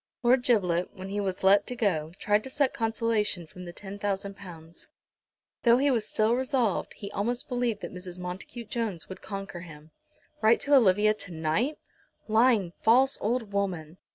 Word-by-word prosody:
Lord 245 Hz, +2 st, +5 dB
Giblet, 180 Hz, -8 st, +1 dB
when 190 Hz, 0 st, -7 dB
he 205 Hz, +1 st, -2 dB
was 190 Hz, -2 st, -3 dB
let 200 Hz, +1 st, +5 dB
to 250 Hz, -, -4 dB
go, 170 Hz, -10 st, 0 dB
tried 210 Hz, +1 st, +1 dB
to -, -, -6 dB
suck 280 Hz, -1 st, +1 dB
consolation 225 Hz, -5 st, 0 dB
from 180 Hz, +3 st, -11 dB
the 175 Hz, -, -7 dB
£10,000. 195 Hz, -4 st, -6 dB, 0.7 s
Though 235 Hz, 0 st, +5 dB
he 280 Hz, +2 st, +3 dB
was 230 Hz, -4 st, 0 dB
still 220 Hz, +2 st, +2 dB
resolved, 255 Hz, -5 st, 0 dB
he 200 Hz, -, -8 dB
almost 235 Hz, +5 st, -2 dB
believed 245 Hz, -4 st, -1 dB
that -, -, -6 dB
Mrs. 180 Hz, -1 st, -8 dB
Montacute 185 Hz, +6 st, -7 dB
Jones 220 Hz, -8 st, -3 dB
would 190 Hz, 0 st, -8 dB
conquer 195 Hz, -3 st, -6 dB
him. 155 Hz, -2 st, -12 dB, 0.5 s
Write 225 Hz, +1 st, +5 dB
to 290 Hz, -, +1 dB
Olivia 215 Hz, -4 st, +5 dB
to 200 Hz, -3 st, -8 dB
night! 165 Hz, -, -1 dB, 0.5 s
Lying, 220 Hz, -5 st, +3 dB
false 260 Hz, +4 st, +4 dB
old 225 Hz, -1 st, -1 dB
woman! 180 Hz, -5 st, -2 dB
205 Hz, 165 wpm, -28 LUFS, 180-235 Hz, 0.7 s, Lord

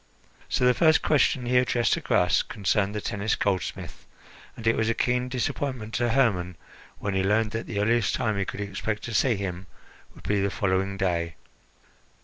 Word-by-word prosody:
So 125 Hz, -, +1 dB
the 125 Hz, -, +5 dB
first 160 Hz, +3 st, +4 dB
question 135 Hz, -3 st, +2 dB
he 125 Hz, +1 st, +3 dB
addressed 120 Hz, -3 st, +1 dB
to -, -, -1 dB
Gras 90 Hz, -1 st, +2 dB
concerned 105 Hz, -1 st, -1 dB
the 105 Hz, -, -2 dB
Tennis 105 Hz, +1 st, -1 dB
goldsmith, 95 Hz, -4 st, -3 dB, 0.5 s
and 115 Hz, -, -9 dB
it 115 Hz, -, +3 dB
was 110 Hz, 0 st, 0 dB
a 115 Hz, -, +1 dB
keen 125 Hz, 0 st, 0 dB
disappointment 125 Hz, -2 st, -3 dB
to 120 Hz, -1 st, +1 dB
Hermon 100 Hz, -9 st, +1 dB, 0.4 s
when 100 Hz, -, -3 dB
he 95 Hz, -, +1 dB
learned 105 Hz, +2 st, +2 dB
that 115 Hz, +1 st, -4 dB
the 100 Hz, -, -3 dB
earliest 115 Hz, +1 st, +2 dB
time 115 Hz, -4 st, 0 dB
he 100 Hz, -, 0 dB
could 100 Hz, -, -6 dB
expect 100 Hz, +1 st, -3 dB
to 115 Hz, -, -5 dB
see 120 Hz, +2 st, +3 dB
him 95 Hz, -2 st, -5 dB, 0.5 s
would -, -, -15 dB
be 100 Hz, -1 st, 0 dB
the 100 Hz, -, +1 dB
following 95 Hz, 0 st, -1 dB
day. 85 Hz, -3 st, -1 dB
105 Hz, 185 wpm, -26 LUFS, 100-120 Hz, 0.5 s, the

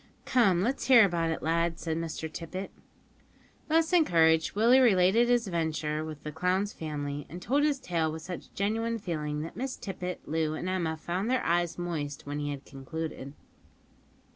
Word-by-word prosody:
"Come, 195 Hz, -8 st, +3 dB
let's 255 Hz, +6 st, -1 dB
hear 245 Hz, -5 st, +8 dB
about 170 Hz, -3 st, 0 dB
it, 160 Hz, -, -3 dB
lad," 165 Hz, +1 st, +1 dB
said 160 Hz, -2 st, -3 dB
Mr 165 Hz, 0 st, -4 dB
Tippet. 175 Hz, +4 st, -6 dB, 1.0 s
Thus 320 Hz, +2 st, +2 dB
encouraged, 165 Hz, -, +4 dB
Willie 235 Hz, +5 st, +6 dB
related 225 Hz, 0 st, +4 dB
his 240 Hz, -1 st, +3 dB
adventure 160 Hz, -4 st, -1 dB
with 155 Hz, -2 st, -8 dB
the 150 Hz, -, -5 dB
clown's 185 Hz, +6 st, 0 dB
family, 145 Hz, -2 st, -5 dB
and 175 Hz, -, -7 dB
told 275 Hz, +10 st, +1 dB
his 290 Hz, -2 st, +2 dB
tale 165 Hz, -8 st, -1 dB
with 160 Hz, 0 st, -7 dB
such 180 Hz, +1 st, -7 dB
genuine 225 Hz, +3 st, 0 dB
feeling, 150 Hz, -7 st, -3 dB
that 160 Hz, -, -7 dB
Miss 260 Hz, +1 st, -3 dB
Tippet, 180 Hz, -2 st, -6 dB
Loo, 155 Hz, 0 st, 0 dB
and 175 Hz, -, -4 dB
Emma 170 Hz, -4 st, -1 dB
found 180 Hz, +7 st, -2 dB
their 255 Hz, 0 st, +1 dB
eyes 175 Hz, 0 st, +1 dB
moist 155 Hz, -5 st, -4 dB
when 145 Hz, +1 st, -4 dB
he 145 Hz, 0 st, -2 dB
had 140 Hz, -1 st, -6 dB
concluded. 140 Hz, 0 st, -6 dB
170 Hz, 170 wpm, -29 LUFS, 155-205 Hz, 1.0 s, hear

